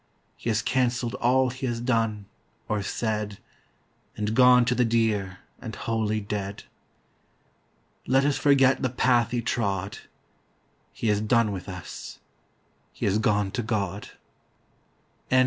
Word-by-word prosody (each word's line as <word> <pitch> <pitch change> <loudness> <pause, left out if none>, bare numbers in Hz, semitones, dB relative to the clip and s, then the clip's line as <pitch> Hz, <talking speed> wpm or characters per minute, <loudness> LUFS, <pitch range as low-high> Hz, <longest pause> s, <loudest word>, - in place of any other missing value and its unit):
He - - -5
has 110 0 +1
cancelled 120 -2 0
all 130 +1 +3
he 130 +1 -4
has 120 -1 -2
done, 115 -4 0 0.4
or 105 -1 -1
said, 105 0 -2 0.8
And 105 0 -1
gone 125 0 +6
to 120 - +2
the 125 0 +2
dear 110 -5 0 0.2
and 115 -3 -6
holy 110 -2 -1
Dead. 100 -1 -5 1.4
Let 135 +1 +3
us 145 -1 +2
forget 135 -2 +4
the 130 - +1
path 120 -1 +2
he 120 -1 -2
trod, 100 -5 -2 0.9
He 115 - -2
has 105 0 +2
done 110 0 +2
with 95 -1 -6
us, 90 -2 -8 0.7
He - - -5
has 100 +2 +2
gone 105 -2 +1
to 120 - -2
God. 105 -5 -3 1.2
PERSIA. 130 - +4
115 Hz, 135 wpm, -26 LUFS, 105-125 Hz, 1.4 s, gone